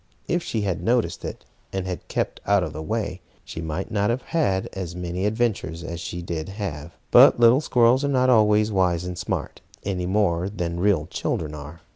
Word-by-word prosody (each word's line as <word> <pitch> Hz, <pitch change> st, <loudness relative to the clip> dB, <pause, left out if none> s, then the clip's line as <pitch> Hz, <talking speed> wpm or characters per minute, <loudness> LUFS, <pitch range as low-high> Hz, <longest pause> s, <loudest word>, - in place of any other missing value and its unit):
If 175 Hz, 0 st, +1 dB
she 115 Hz, -8 st, -2 dB
had 95 Hz, -5 st, -1 dB
noticed 115 Hz, +5 st, 0 dB
it, -, -, -7 dB, 0.3 s
and 95 Hz, -1 st, -3 dB
had 90 Hz, -2 st, -5 dB
kept -, -, -2 dB
out 100 Hz, -2 st, +4 dB
of 80 Hz, -3 st, -4 dB
the 75 Hz, -, -5 dB
way, 100 Hz, 0 st, -3 dB, 0.2 s
she 80 Hz, -, -6 dB
might 80 Hz, +6 st, -4 dB
not 105 Hz, -1 st, +1 dB
have 120 Hz, +2 st, -1 dB
had 120 Hz, -, 0 dB
as 90 Hz, -3 st, -5 dB
many 90 Hz, +2 st, -2 dB
adventures 105 Hz, -7 st, -1 dB
as 85 Hz, -1 st, -5 dB
she 85 Hz, 0 st, -5 dB
did 85 Hz, -1 st, -4 dB
have. 85 Hz, -6 st, -5 dB, 0.2 s
But -, -, +8 dB
little 120 Hz, +4 st, +6 dB
squirrels 125 Hz, -1 st, +3 dB
are -, -, +1 dB
not 130 Hz, -2 st, +2 dB
always 105 Hz, -1 st, +4 dB
wise 90 Hz, -3 st, +1 dB
and 90 Hz, 0 st, -4 dB
smart, -, -, -4 dB, 0.2 s
any 90 Hz, -2 st, -2 dB
more 95 Hz, -2 st, +1 dB
than 85 Hz, -4 st, -3 dB
real 95 Hz, -5 st, +2 dB
children 75 Hz, -1 st, -3 dB
are. 75 Hz, +2 st, -9 dB
95 Hz, 195 wpm, -24 LUFS, 85-110 Hz, 0.3 s, But